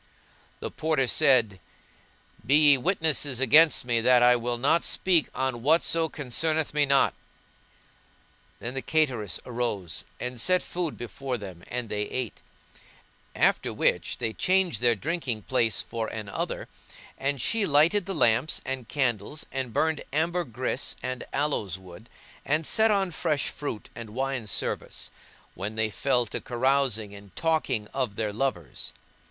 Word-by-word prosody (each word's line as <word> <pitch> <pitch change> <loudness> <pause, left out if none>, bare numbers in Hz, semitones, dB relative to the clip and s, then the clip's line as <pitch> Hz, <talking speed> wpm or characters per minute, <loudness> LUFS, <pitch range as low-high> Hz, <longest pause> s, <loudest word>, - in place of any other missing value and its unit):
[FN#166] - - -32
The - - -4
Porter 155 -4 0
said, 120 -10 +3 0.8
Be 135 +6 +3 0.2
ye 140 - +6
witnesses 155 -5 +2
against 150 +3 +5
me 120 -2 +1
that 125 +1 +5
I 125 0 +6
will 120 0 -2
not 140 +7 +2
speak 175 -5 +2
on 130 -2 -2
whatso 160 +3 +3
concerneth 155 +3 -1
me 150 -1 +2
not." 135 0 +3 1.5
Then 120 - -5
the 135 - -3
cateress 125 - 0
arose, 115 -8 -3 0.2
and 125 -1 -4
set 185 +5 +3
food 175 -4 -3
before 125 +3 -4
them 95 -5 -10
and 125 -1 -3
they 105 -1 -3
ate; 125 -4 -4 0.9
after - - +2
which - - 0
they 115 -3 -2
changed 185 - +1
their 120 -1 +4
drinking 130 - -3
place 115 -2 +1
for 115 -1 -4
another, 105 -3 -4 0.5
and 140 0 -2
she 220 - +1
lighted 165 +7 +3
the 195 - -3
lamps 120 +2 +2
and 130 -3 -4
candles 130 0 -1
and 130 -3 -3
burned 160 +5 0
ambergris 150 -5 -1
and 130 -1 -4
aloes 135 - -1
wood, 95 +4 -14 0.3
and 155 +2 0
set 220 +11 +4
on 195 -3 +1
fresh 155 -2 -1
fruit 140 -7 -6
and 115 -2 -8
the - - -13
wine 130 -2 -2
service, 95 - -2 0.4
when 100 +4 -5
they 110 -1 0
fell 125 +4 +1
to - - -5
carousing 120 -4 0
and 100 -3 -14
talking 155 -9 0
of 125 -7 -2
their 105 -1 -2
lovers. 105 - -3
130 Hz, 145 wpm, -27 LUFS, 115-155 Hz, 1.5 s, ye